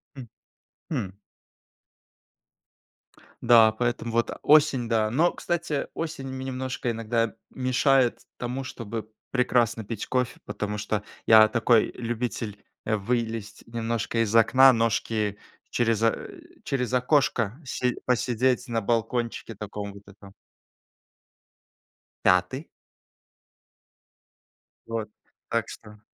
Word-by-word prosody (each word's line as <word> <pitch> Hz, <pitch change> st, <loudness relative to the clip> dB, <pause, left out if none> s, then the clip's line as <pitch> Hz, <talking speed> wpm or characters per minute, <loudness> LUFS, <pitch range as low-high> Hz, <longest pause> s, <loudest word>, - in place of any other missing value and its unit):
М, 130 Hz, -3 st, -9 dB, 0.6 s
хм. 130 Hz, -, -1 dB, 2.4 s
Да, 115 Hz, -2 st, +7 dB
поэтому 120 Hz, +1 st, -2 dB
вот 115 Hz, +1 st, +1 dB
осень, 145 Hz, -6 st, +4 dB
да. 110 Hz, -2 st, +2 dB
Но, 155 Hz, +10 st, +3 dB
кстати, 170 Hz, -4 st, -2 dB
осень 155 Hz, -4 st, -5 dB
мне 130 Hz, 0 st, -5 dB
немножко 130 Hz, -1 st, -3 dB
иногда 115 Hz, 0 st, -1 dB, 0.2 s
мешает 130 Hz, -1 st, +2 dB, 0.2 s
тому, 125 Hz, +2 st, -4 dB
чтобы 115 Hz, -3 st, -6 dB, 0.2 s
прекрасно 120 Hz, -3 st, +1 dB
пить 110 Hz, 0 st, -5 dB
кофе, 125 Hz, -2 st, -1 dB
потому 105 Hz, 0 st, -4 dB
что 105 Hz, 0 st, -2 dB, 0.2 s
я 110 Hz, -1 st, +8 dB
такой 115 Hz, 0 st, +3 dB
любитель, 115 Hz, -3 st, -4 dB, 0.2 s
э, 110 Hz, -, +1 dB
вылезть 115 Hz, 0 st, -3 dB
немножко 115 Hz, 0 st, -2 dB
из 110 Hz, 0 st, -2 dB
окна, 130 Hz, +4 st, +7 dB
ножки 110 Hz, -2 st, 0 dB, 0.3 s
через, 115 Hz, -3 st, +1 dB
э, 115 Hz, -, -1 dB, 0.2 s
через 125 Hz, -3 st, -1 dB
окошко 125 Hz, -4 st, +2 dB
си 125 Hz, -1 st, -1 dB
посидеть 125 Hz, +1 st, +1 dB
на 115 Hz, -2 st, -1 dB
балкончике 115 Hz, +1 st, -2 dB
таком 100 Hz, 0 st, -6 dB
вот 100 Hz, 0 st, -13 dB
этом. 100 Hz, 0 st, -15 dB, 1.9 s
5. 90 Hz, -, +2 dB, 2.2 s
Вот. 115 Hz, -2 st, -3 dB, 0.4 s
Так 115 Hz, 0 st, 0 dB
что 105 Hz, -1 st, -12 dB
115 Hz, 105 wpm, -26 LUFS, 110-125 Hz, 2.4 s, я